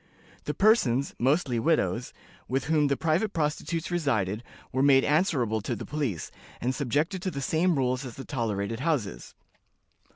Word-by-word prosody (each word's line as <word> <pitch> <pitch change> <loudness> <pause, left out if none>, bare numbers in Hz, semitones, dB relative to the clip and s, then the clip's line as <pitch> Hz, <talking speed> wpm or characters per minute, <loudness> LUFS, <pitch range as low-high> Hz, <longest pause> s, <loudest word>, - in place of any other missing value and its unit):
The - - -2
persons 140 - +3
(mostly 130 -1 +2
widows) 120 - +1 0.4
with 130 +1 0
whom 150 -1 +2
the 140 -1 +1
private 170 +6 +1
prostitutes 165 +2 -2
resided 110 - 0 0.3
were 130 - 0
made 135 -1 +6
answerable 145 - +1
to - - -2
the - - -7
police, 135 - -3 0.3
and 125 +2 0
subjected 150 - -1
to 185 - -1
the 145 -6 -5
same 165 +5 +1
rules 130 -1 0
as 125 -4 -7
the 135 - -8
tolerated 115 -4 -2
houses. 135 -9 -2
140 Hz, 155 wpm, -27 LUFS, 120-160 Hz, 0.4 s, made